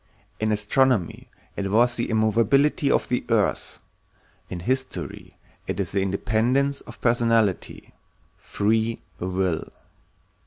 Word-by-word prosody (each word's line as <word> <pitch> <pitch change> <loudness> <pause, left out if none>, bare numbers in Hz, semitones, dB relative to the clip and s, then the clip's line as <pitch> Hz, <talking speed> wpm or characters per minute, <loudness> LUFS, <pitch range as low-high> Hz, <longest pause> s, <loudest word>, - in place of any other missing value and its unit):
In 110 0 0
astronomy 105 - +1 0.3
it 100 -1 -2
was 120 +4 +3
the 120 - -2
immovability 115 +7 +2
of - - +2
the 125 - -1
earth, 110 -4 0 0.7
in 90 - -5
history 130 +7 -4 0.3
it 90 - -3
is 95 -4 -2
the 100 - 0
independence 115 +8 0
of 120 - -11
personality—free 115 -1 -1 0.2
will. 90 -2 -1
110 Hz, 105 wpm, -24 LUFS, 100-120 Hz, 0.7 s, was